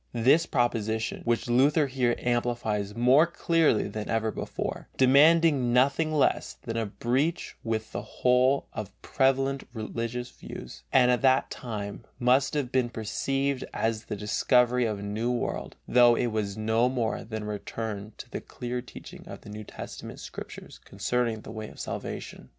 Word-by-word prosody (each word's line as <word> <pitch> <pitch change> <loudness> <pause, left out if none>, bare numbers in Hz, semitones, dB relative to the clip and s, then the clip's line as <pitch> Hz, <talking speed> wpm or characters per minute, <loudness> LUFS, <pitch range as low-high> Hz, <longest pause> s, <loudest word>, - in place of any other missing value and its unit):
This 135 +8 +4
proposition, 115 -3 0
which 120 0 0
Luther 140 +5 +4
here 125 -3 +1
amplifies 120 -4 -1
more 130 +7 +5
clearly 165 -7 +2
than 110 -1 -5
ever 110 -1 0
before, - - -5
demanded 155 +5 +6
nothing 135 +4 +2
less 150 -2 +1
than 115 -2 -4
a 115 -2 -1
breach 130 - -1
with 110 -1 -2
the - - -3
whole 125 +2 +2
of 105 -2 -7
prevalent 135 +1 +1
religious 115 +2 -4
views, - - -10
and 125 -1 +5
at 125 - +1
that 130 -1 +3
time 105 -4 -5
must 130 +4 +3
have 135 -4 -1
been 130 -2 +1
perceived 135 +4 -1
as 110 -1 -1
the 105 - -4
discovery 125 +4 +2
of 110 -2 -1
a 100 - -7
new 110 +4 -1
world, 120 - -3
though 120 -1 +6
it 120 0 0
was 105 -2 -2
no 110 +3 +2
more 120 -3 -1
than 110 -1 -5
a - - -6
return 105 0 -5
to - - -9
the - - -4
clear 125 0 -5
teaching - - -11
of - - -9
the - - -12
New 105 +1 -7
Testament - - -9
Scriptures - - -9
concerning 120 -3 -1
the - - -10
way 110 -1 -6
of - - -14
salvation. - - -6
120 Hz, 160 wpm, -27 LUFS, 110-130 Hz, -, demanded